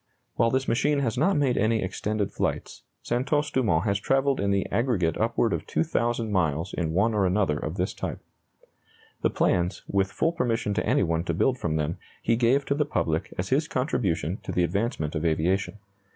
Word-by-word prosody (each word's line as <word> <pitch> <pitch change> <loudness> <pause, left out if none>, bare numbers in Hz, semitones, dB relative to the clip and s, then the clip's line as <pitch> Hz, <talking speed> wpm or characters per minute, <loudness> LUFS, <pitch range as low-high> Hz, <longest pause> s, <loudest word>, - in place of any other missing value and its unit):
While 115 - +3
this 130 +2 0
machine 145 +5 +2
has 115 -5 0
not 165 +7 +2
made 140 -4 +2
any 110 0 +2
extended 100 +2 -2
flights, - - -3 0.2
Santos 140 +4 0
Dumont 105 -12 +2
has 100 -1 +1
travelled 135 +4 +1
in 100 - 0
the 100 -1 +1
aggregate 100 - +1
upward 115 +1 +1
of - - -3
2,000 120 -8 0
miles 80 -4 0
in 80 -3 -1
one 105 +6 +2
or 100 -3 +2
another 90 -5 +1
of - - -4
this - - -1
type. - - -4 1.0
The - - +2
plans, 90 +2 0
with 95 -1 0
full 165 - +1
permission 115 -9 -1
to 105 - -1
any - - +3
one 85 -2 0
to - - -1
build 130 -1 +1
from 80 -7 -1
them, 80 +1 -2 0.2
he 115 - +3
gave 125 +4 +2
to - - +1
the 150 +1 +1
public 80 - -1
as 90 - -2
his 150 +4 +2
contribution 100 - -1
to - - -6
the 90 - +1
advancement 90 - -1
of 75 -1 -2
aviation. 90 +5 0
105 Hz, 195 wpm, -26 LUFS, 90-125 Hz, 1.0 s, While